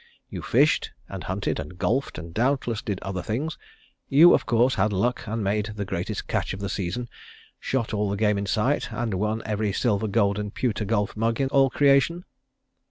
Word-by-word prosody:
You - - -6
fished, - - +2
and 95 -2 -7
hunted, 95 +2 -2
and 80 +4 -7
golfed, 130 +9 -1
and 85 +1 -8
doubtless 120 -1 0
did 100 -3 -3
other 95 -2 -3
things. 135 - -3 0.5
You, 160 +6 +8
of - - +1
course, 120 +2 +3
had 110 - +1
luck 120 +6 -1
and 110 +1 -2
made 105 +2 -1
the 100 -1 -3
greatest 95 -3 -4
catch - - -1
of - - -9
the 100 -1 -3
season; 100 +6 -3 0.5
shot 125 -5 -2
all 105 -1 0
the 100 - -2
game 105 -1 +2
in 100 - -3
sight, 120 +9 0
and 115 -3 -2
won 105 +4 -1
every 105 -1 -1
silver, 110 0 0
gold 100 -1 +1
and 105 -1 -4
pewter 110 -4 -1
golf 105 -1 0
mug 115 +1 0
in 135 -1 +1
all 135 -1 +4
creation?" 145 +6 +3
110 Hz, 195 wpm, -25 LUFS, 100-125 Hz, 0.5 s, You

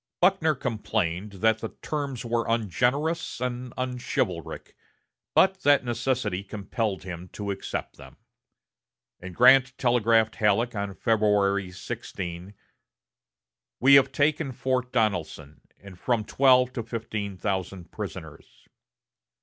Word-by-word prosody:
Buckner 175 -4 +3
complained 100 -4 -2
that 110 0 +4
the 115 - -7
terms 140 -5 -3
were 115 0 -1
ungenerous 125 - 0
and 125 0 -4
unchivalric, 125 - -3 0.6
but 190 0 +4
that 145 -2 +4
necessity 120 -5 -1
compelled 100 0 -3
him 90 -1 -8
to 100 -1 -4
accept 95 - -5
them; - - -14 1.0
and 90 -1 -9
Grant 130 +1 +6
telegraphed 115 -3 +2
Halleck 110 +2 +2
on 100 -2 -4
February 100 -3 +1
16: 90 +1 -7 1.2
"We 135 +3 +6
have 135 -1 +7
taken 145 +1 +1
Fort 125 0 -1
Donelson, 85 - -2 0.2
and 95 -2 -14
from 115 -1 0
twelve 130 -1 +4
to 120 - -3
fifteen 110 -4 -5
thousand 95 -2 -4
prisoners." - - -9
115 Hz, 110 wpm, -26 LUFS, 100-130 Hz, 1.2 s, have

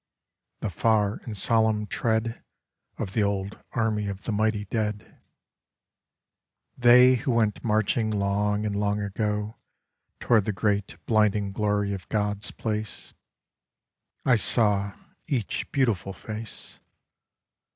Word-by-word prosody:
The 105 - -2
far 105 +2 +1
and 110 -3 -5
solemn 110 0 +2
tread 110 +2 -1 0.5
Of 95 - -4
the 110 - +1
old 100 0 -1
army 110 -3 0
of 100 -1 -5
the - - -3
mighty 105 0 0
dead 105 0 -3 0.7
— - - -63 0.7
They 125 +1 +7
who 120 - -4
went 115 -4 +1
marching 110 0 +1
long 105 0 0
and 105 -1 -2
long 105 0 0
ago 105 +1 -2 0.6
Toward 110 -5 +3
the 110 - -1
great 100 0 -1
blinding 105 -2 +2
glory 105 0 0
of 95 -3 -7
God's 105 -1 -1
place. 110 -2 -4 1.1
I 125 -2 +5
saw 100 -2 +2 0.3
each 120 -8 -2
beautiful 115 -8 0
face. 110 +3 -7
105 Hz, 120 wpm, -26 LUFS, 100-110 Hz, 1.1 s, They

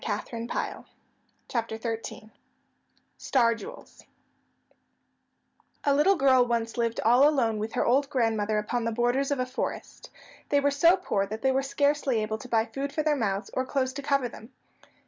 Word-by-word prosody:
[Illustration: 230 +2 -4 1.0
Star 230 -2 -1
Jewels] 220 -1 -5 0.9
STAR 235 -4 +2
JEWELS 465 - -11 1.8
A 285 - +3
little 300 +8 +4
girl 265 -5 +4
once 235 -1 -2
lived 230 -1 -1
all 245 +6 +5
alone 230 -7 0
with 215 +1 -4
her - - 0
old 275 +3 +2
grandmother 220 -5 0
upon 230 +3 -1
the 230 - 0
borders 245 +4 +1
of 285 -2 -1
a 255 - +1
forest. 255 +1 -5 0.4
They 285 - +3
were 285 0 +2
so 335 +6 +5
poor 200 - -1
that 220 +2 -7
they 265 - +3
were 265 +1 +1
scarcely 280 -4 +1
able 215 +1 -3
to 250 - -11
buy 225 -1 +2
food 275 +3 -5
for 310 - -1
their 305 -1 +2
mouths, 205 -5 -2
or 260 - 0
clothes 260 -1 -1
to 285 - -5
cover 275 -2 +1
them. 230 +1 -13
250 Hz, 165 wpm, -27 LUFS, 225-280 Hz, 1.8 s, all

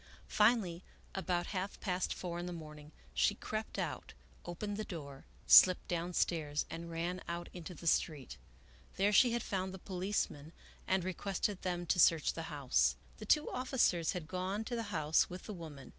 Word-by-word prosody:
Finally, 210 -6 +3 0.3
about 180 -2 -1
half 190 +1 -3
past 185 -2 -1
four 175 -1 -4
in 175 - -4
the - - -4
morning, 150 -3 -9 0.2
she - - +3
crept - - -5
out, - - -4 0.3
opened 205 +4 -4
the 215 - -3
door, 140 -8 -8 0.2
slipped 185 -1 +8
downstairs, 165 -3 0
and 170 +1 -6
ran 170 +2 -3
out 170 0 -4
into 180 0 -8
the 170 - -11
street. 150 - 0 0.6
There 200 +2 +3
she 240 +3 +6
had 235 - -1
found 190 -1 -3
the - - -7
policemen 180 -5 -3 0.3
and 190 -1 +2
re 185 +1 -2
quested 195 +2 -2
them 175 -1 -2
to 180 - +1
search 165 -2 +5
the 165 -1 -6
house. 130 - +2 0.2
The 215 - -8
two 300 +6 +4
officers 250 - +1
had 175 -4 -5
gone 185 +4 -2
to 240 - -4
the 230 - -1
house 155 -5 +2
with 180 +1 -8
the 210 - -6
woman. 155 -6 -9
175 Hz, 175 wpm, -34 LUFS, 160-190 Hz, 0.6 s, slipped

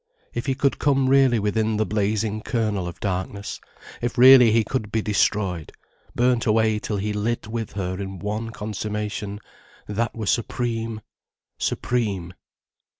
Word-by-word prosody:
If 120 +3 -4
he 135 - +1
could 140 +1 +1
come 135 -2 +2
really 135 -2 +5
within 110 +1 0
the 110 - +1
blazing 105 +1 -1
kernel 105 -6 -1
of 85 - -8
darkness, 100 +1 -3 0.4
if 120 +1 -2
really 125 -1 +9
he 115 +1 +4
could 110 -2 -3
be 110 -1 0
destroyed, 100 -5 0 0.4
burnt 125 -1 +2
away 110 0 +3
till 105 -1 -3
he 105 +2 -2
lit 110 +2 -2
with 115 -1 -4
her 95 -1 -3
in 95 -1 -5
one 105 +4 -3
consummation, 105 -1 -4 0.5
that 110 +3 -2
were 110 -2 -4
supreme, 115 0 -1 0.6
supreme. 100 -8 -1
110 Hz, 145 wpm, -23 LUFS, 105-115 Hz, 0.6 s, really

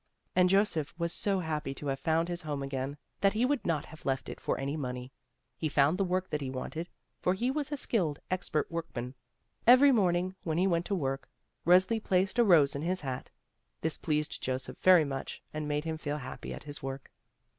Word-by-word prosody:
And 180 0 +5
Joseph 190 -7 +2
was 170 0 -1
so 195 -2 +1
happy 150 -4 -3
to 145 - -7
have 135 -1 -1
found 165 +3 +1
his 175 0 -3
home 145 -3 -3
again, 135 +1 -3 0.2
that 195 0 +3
he 225 +3 +2
would 285 0 +1
not 155 -4 0
have 160 - -13
left 135 -1 -1
it - - -8
for - - 0
any 140 +2 -2
money. 125 -3 -4 0.4
He 155 - -2
foimd 145 +4 +3
the 195 - +2
work 185 0 -1
that 150 - -1
he 135 - -3
wanted, 155 +6 -5 0.3
for 180 - +1
he 245 +6 0
was 290 0 -2
a 290 - -1
skilled, 175 - 0
expert 180 -4 -1
workman. 130 -7 -4 0.5
Every 260 +4 +8
morning, 185 -5 +2
when 160 -1 -2
he 180 - +3
went 170 -2 +1
to 200 - 0
work, 135 -5 -2 0.4
Resli 185 +5 +5
placed 190 +5 +1
a - - +7
rose 160 -9 +5
in 140 - -3
his 180 +3 -1
hat. 130 -3 -4 0.5
This 160 -1 -1
pleased 150 -1 -1
Joseph 130 0 -3
very 180 -4 +7
much, 135 -1 -5
and 155 -1 -3
made 150 0 0
him 160 -1 -3
feel 145 -1 -2
happy 130 -3 -7
at - - -7
his 145 -1 -5
work. 135 0 -6
160 Hz, 210 wpm, -31 LUFS, 140-185 Hz, 0.5 s, Every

